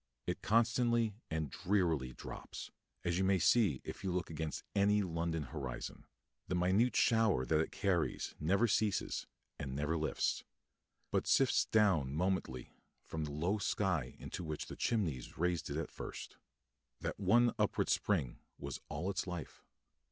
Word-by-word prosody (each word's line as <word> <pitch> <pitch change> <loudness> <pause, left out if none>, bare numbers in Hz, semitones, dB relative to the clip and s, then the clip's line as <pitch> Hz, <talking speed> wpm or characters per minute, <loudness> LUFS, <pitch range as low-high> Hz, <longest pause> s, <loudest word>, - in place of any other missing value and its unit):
It - - -2
constantly 115 +1 +3 0.2
and 80 -3 -2
drearily 85 -10 +1
drops, - - -8 0.3
as 85 +1 0
you - - +2
may 95 0 +4
see 90 - +4
if - - -7
you 95 - 0
look 90 -1 -2
against 80 -1 -3
any 100 +1 +4
London 85 -2 -1
horizon; 65 -2 -6 0.4
the 90 - -1
minute 95 +8 +3
shower 110 - +4
that 75 +5 +2
it 80 - 0
carries 90 -5 0
never 100 +9 +3
ceases 105 -2 0 0.3
and 65 -2 -4
never 75 +3 0
lifts, 80 -1 0 0.7
but - - +1
sifts - - +4
down 85 -11 +3
momently 85 -8 -1 0.3
from 80 -1 -3
the 75 - -5
low 85 +8 0
sky - - 0
into - - -6
which 75 -2 -4
the - - -8
chimneys 80 - -1
raised 85 -2 0
it 70 - -2
at 80 - -3
first. - - -7 0.7
That - - -3
one 120 +5 +4
upward - - +2
spring 80 -12 +1 0.2
was 70 -2 -6
all 80 +4 -3
its 95 - -2
life. 90 -3 -6
90 Hz, 150 wpm, -35 LUFS, 75-100 Hz, 0.7 s, may